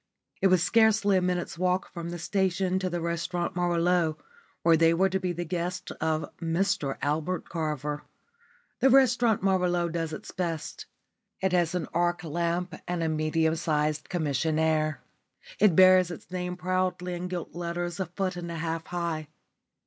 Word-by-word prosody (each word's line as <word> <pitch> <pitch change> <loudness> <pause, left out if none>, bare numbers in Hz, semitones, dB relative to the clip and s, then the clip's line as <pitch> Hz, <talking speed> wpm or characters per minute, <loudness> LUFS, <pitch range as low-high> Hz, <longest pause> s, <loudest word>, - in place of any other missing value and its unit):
It 195 - +5
was 185 -2 +4
scarcely 220 -3 +4
a 185 - +3
minute's 180 -2 -2
walk 185 +1 0
from 170 -1 -5
the 175 - -5
station 185 +1 0
to 185 -1 -1
the 175 -1 -3
Restaurant 170 +2 -2
Merveilleux, 175 -2 +1 0.5
where 165 -1 +6
they 165 +1 +4
were 190 +3 +3
to 190 +1 0
be 185 -1 -1
the 175 0 -4
guests 180 +2 -3
of 160 0 0
Mr 165 -3 0
Albert 160 +5 -1
Carver. 150 -3 -3 0.8
The 270 - +5
Restaurant 245 -5 +4
Merveilleux 180 -3 +1
does 165 -1 -2
its 155 - -7
best. 165 -4 -4 0.5
It 190 -1 0
has 175 -1 +2
an 175 -4 -2
arc 175 +1 +1
lamp 170 +2 -1
and 175 -1 -1
a 160 - 0
medium 160 +1 +1
sized 155 -2 -1
commissionaire. 155 -1 0 0.6
It 205 -6 +5
bears 185 -1 +7
its 175 0 -9
name 180 -1 -3
proudly 185 0 -1
in 175 +1 -4
gilt 180 -2 -5
letters 175 0 -4
a 190 - -1
foot 185 +1 -2
and 175 -1 -6
a - - -4
half 165 0 -3
high. 170 -3 -3
175 Hz, 165 wpm, -28 LUFS, 165-185 Hz, 0.8 s, bears